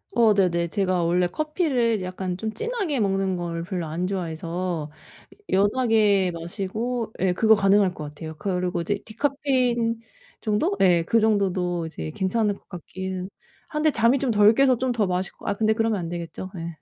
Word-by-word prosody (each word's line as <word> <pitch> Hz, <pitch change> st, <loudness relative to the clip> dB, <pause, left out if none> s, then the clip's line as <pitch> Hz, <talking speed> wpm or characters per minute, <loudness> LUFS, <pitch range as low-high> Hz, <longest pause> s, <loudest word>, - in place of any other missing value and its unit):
어 230 Hz, -2 st, +5 dB
네네. 175 Hz, -4 st, +2 dB
제가 185 Hz, -2 st, 0 dB
원래 175 Hz, +1 st, +2 dB
커피를 260 Hz, -, 0 dB
약간 185 Hz, 0 st, -4 dB
좀 220 Hz, +3 st, -3 dB
진하게 430 Hz, -, -2 dB
먹는 195 Hz, -2 st, +1 dB
걸 170 Hz, -1 st, -4 dB
별로 180 Hz, -1 st, -3 dB
안 170 Hz, +4 st, -2 dB
좋아해서 170 Hz, -3 st, -3 dB, 0.6 s
여 190 Hz, -, +4 dB
연하게 215 Hz, -7 st, +3 dB
마시고 215 Hz, +7 st, -4 dB
예. 185 Hz, -1 st, +2 dB
그거 220 Hz, +4 st, +5 dB
가능할 195 Hz, -2 st, +3 dB
거 155 Hz, -, -7 dB
같아요. 155 Hz, +2 st, -8 dB
그리고 180 Hz, 0 st, -1 dB
이제 200 Hz, +4 st, -2 dB
디카페인 245 Hz, -2 st, 0 dB, 0.4 s
정도? 210 Hz, -2 st, 0 dB
예. 175 Hz, -3 st, +4 dB
그 230 Hz, +7 st, +2 dB
정도도 185 Hz, -5 st, +1 dB
이제 115 Hz, -, -6 dB
괜찮을 205 Hz, +2 st, 0 dB
거 -, -, -21 dB
같기는 185 Hz, +1 st, -6 dB, 0.4 s
한데 305 Hz, 0 st, +1 dB
잠이 235 Hz, +1 st, +3 dB
좀 260 Hz, -3 st, 0 dB
덜 210 Hz, 0 st, +6 dB
깨서 265 Hz, -1 st, +4 dB
좀 255 Hz, +1 st, 0 dB
더 230 Hz, -4 st, +1 dB
마실 180 Hz, 0 st, -2 dB
거 -, -, -16 dB
아 200 Hz, -, +2 dB
근데 220 Hz, +1 st, +2 dB
그러면 225 Hz, -2 st, 0 dB
안 170 Hz, -2 st, -4 dB
되겠죠? 175 Hz, +2 st, -6 dB
예. 165 Hz, -2 st, -6 dB
195 Hz, 330 characters per minute, -24 LUFS, 175-225 Hz, 0.6 s, 덜